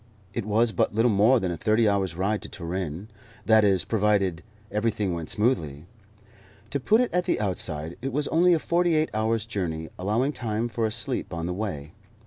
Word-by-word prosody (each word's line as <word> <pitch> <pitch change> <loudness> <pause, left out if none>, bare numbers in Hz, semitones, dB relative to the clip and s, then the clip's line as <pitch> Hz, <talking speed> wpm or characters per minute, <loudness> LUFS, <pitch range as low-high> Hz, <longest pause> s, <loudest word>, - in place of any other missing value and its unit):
It 115 -3 -3
was 110 +2 +3
but 105 - 0
little 115 +2 +3
more 110 +6 +4
than 95 -4 -2
a 85 - -4
thirty 110 +3 +2
hours' 95 -4 0
ride 100 +4 -1
to - - -7
Turin 90 +1 -5 0.4
that 110 -1 +5
is, 95 -3 +3
providing 100 -5 +1 0.3
everything 105 -3 0
went 85 -2 -5
smoothly. 80 - 0 0.9
To 140 - -1
put 215 - +3
it 250 - -1
at 180 0 +1
the - - 0
outside, 85 -5 -1
it 135 +2 -3
was 145 +3 0
only 175 +2 +4
a - - +4
forty 170 +1 +1
eight 155 0 +1
hours' 110 0 0
journey, 85 -7 -4
allowing 115 +10 0
time 115 -1 -2
for 115 0 -1
a - - -4
sleep 115 -4 -2
on 85 0 -3
the 90 - -2
way. 90 -8 -5
105 Hz, 195 wpm, -26 LUFS, 90-120 Hz, 0.9 s, that